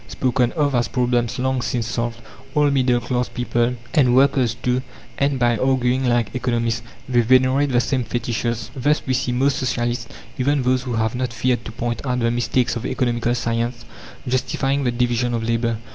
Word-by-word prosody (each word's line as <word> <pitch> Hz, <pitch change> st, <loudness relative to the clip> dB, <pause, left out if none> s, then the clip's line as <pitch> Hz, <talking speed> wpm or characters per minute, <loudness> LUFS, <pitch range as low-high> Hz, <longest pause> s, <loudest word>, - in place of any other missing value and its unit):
spoken 125 Hz, -1 st, 0 dB
of 145 Hz, -4 st, +1 dB
as 120 Hz, -1 st, +2 dB
problems 120 Hz, -2 st, 0 dB
long 130 Hz, 0 st, 0 dB
since 120 Hz, -1 st, -1 dB
solved, 115 Hz, +1 st, -3 dB, 0.4 s
all 150 Hz, -1 st, +4 dB
middle 125 Hz, -3 st, +2 dB
class 125 Hz, 0 st, -2 dB
people, 120 Hz, 0 st, 0 dB, 0.2 s
and 125 Hz, -6 st, +4 dB
workers 130 Hz, -3 st, +3 dB
too, 125 Hz, +1 st, 0 dB, 0.4 s
end 140 Hz, -1 st, +1 dB
by 120 Hz, -1 st, +2 dB
arguing 130 Hz, +1 st, +1 dB
like 120 Hz, -4 st, +1 dB
economists; 115 Hz, -2 st, -1 dB, 0.3 s
they 125 Hz, -2 st, +3 dB
venerate 130 Hz, +4 st, +3 dB
the 125 Hz, -2 st, +3 dB
same 130 Hz, +1 st, 0 dB
fetishes. 120 Hz, -1 st, -3 dB
Thus 145 Hz, +4 st, +1 dB
we 130 Hz, -, 0 dB
see 130 Hz, -1 st, 0 dB
most 135 Hz, +2 st, +1 dB
socialists, 120 Hz, -3 st, -1 dB, 0.3 s
even 140 Hz, +1 st, +1 dB
those 130 Hz, 0 st, +2 dB
who 125 Hz, -1 st, -4 dB
have 110 Hz, -1 st, 0 dB
not 125 Hz, 0 st, -2 dB
feared 120 Hz, 0 st, 0 dB
to -, -, -6 dB
point 120 Hz, 0 st, -3 dB
out 125 Hz, -2 st, -1 dB
the 115 Hz, -1 st, +1 dB
mistakes 120 Hz, +1 st, 0 dB
of 115 Hz, -, -4 dB
economical 120 Hz, -1 st, 0 dB
science, 115 Hz, 0 st, -2 dB, 0.4 s
justifying 135 Hz, +2 st, 0 dB
the 120 Hz, -, +2 dB
division 120 Hz, 0 st, 0 dB
of 115 Hz, -, -2 dB
labour. 115 Hz, 0 st, 0 dB
125 Hz, 180 wpm, -21 LUFS, 120-130 Hz, 0.4 s, all